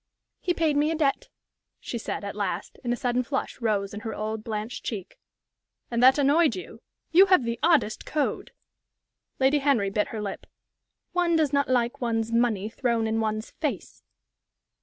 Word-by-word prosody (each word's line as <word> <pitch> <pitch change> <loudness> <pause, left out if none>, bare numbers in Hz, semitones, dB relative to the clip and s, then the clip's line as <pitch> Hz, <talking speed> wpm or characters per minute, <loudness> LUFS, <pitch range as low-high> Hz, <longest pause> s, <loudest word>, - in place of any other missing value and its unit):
"He 355 - -1
paid 320 -3 +1
me 295 +1 +3
a 325 - 0
debt," 290 -3 0 0.5
she 235 - -5
said, 220 - -4
at 200 0 -5
last, 195 -3 -3
and 240 - -1
a - - +2
sudden 245 0 0
flush 265 0 -4
rose 205 -3 0
in 205 - -5
her 220 0 -5
old, 215 0 -4
blanched 220 +1 -4
cheek. 195 -5 -6 0.7
"And 235 0 0
that 260 +2 +7
annoyed 290 +3 +4
you? 370 - -9 0.3
You 375 +4 +7
have 370 -8 +5
the 235 0 -3
oddest 300 -11 +2
code!" 300 -2 -2 0.9
Lady 270 +2 +4
Henry 260 -9 +2
bit 210 +1 0
her 220 - -6
lip. 200 -2 -5 0.6
"One 350 -2 +2
does 305 -3 +2
not 280 -1 +2
like 245 -1 +1
one's 225 -2 -1
money 230 -4 +1
thrown 230 0 0
in 220 0 0
one's 215 0 -2
face." - - -4
235 Hz, 175 wpm, -26 LUFS, 215-285 Hz, 0.9 s, that